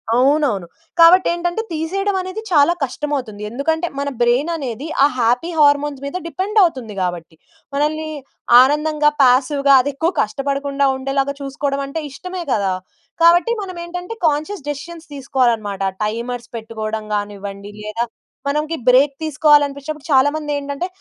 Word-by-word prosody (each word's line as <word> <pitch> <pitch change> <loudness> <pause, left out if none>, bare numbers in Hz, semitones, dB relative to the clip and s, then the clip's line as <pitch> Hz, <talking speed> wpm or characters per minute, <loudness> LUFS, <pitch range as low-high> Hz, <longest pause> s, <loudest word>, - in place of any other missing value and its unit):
అవునవును. 260 - +2 0.3
కాబట్టి 350 +3 +7
ఏంటంటే, 345 +4 -2
తీసేయడమనేది 375 +4 -2
చాలా 315 0 +4
కష్టమవుతుంది. 260 -6 -3
ఎందుకంటే, 320 +7 -1
మన 280 - -1
బ్రైన్ 245 +7 +2
అనేది 275 -1 -5 0.2
ఆ - - +8
హ్యాపీ 245 +8 +1
హార్మోన్స్ 290 -1 +3
మీద 280 +6 -3
డిపెండ్ 380 +7 -3
అవుతుంది 260 - -1
కాబట్టి. 175 -3 -4 0.4
మనల్ని 310 +2 -1 0.5
ఆనందంగా, 300 +2 +2
పాసివ్‌గా 275 +2 +4
అదెక్కువ 285 +5 -1
కష్టపడకుండా 275 +3 -1
ఉండేలాగా 275 +1 -1
చూసుకోవడమంటే 275 +2 -3
ఇష్టమే 365 +5 -6
కదా! 195 -3 +1 0.5
కాబట్టి 345 +7 +5
మనమేంటంటే 360 +1 -6
కాన్షియస్ 305 +3 -2
డెసిషన్స్ 325 +3 -7
తీసుకోవాలన్నమాట. 235 -7 0 0.2
టైమర్స్ 235 +2 -4
పెట్టుకోవడం 220 -1 -5
కానివ్వండి, 205 0 -5
లేదా 215 +3 -2 0.4
మనకి 300 +3 -1
బ్రేక్ 270 +3 +5
తీసుకోవాలనిపించినప్పుడు 295 -1 +1
చాలామంది 290 +3 +2
ఏంటంటే, 285 +4 -3
280 Hz, 115 wpm, -19 LUFS, 250-315 Hz, 0.5 s, ఆ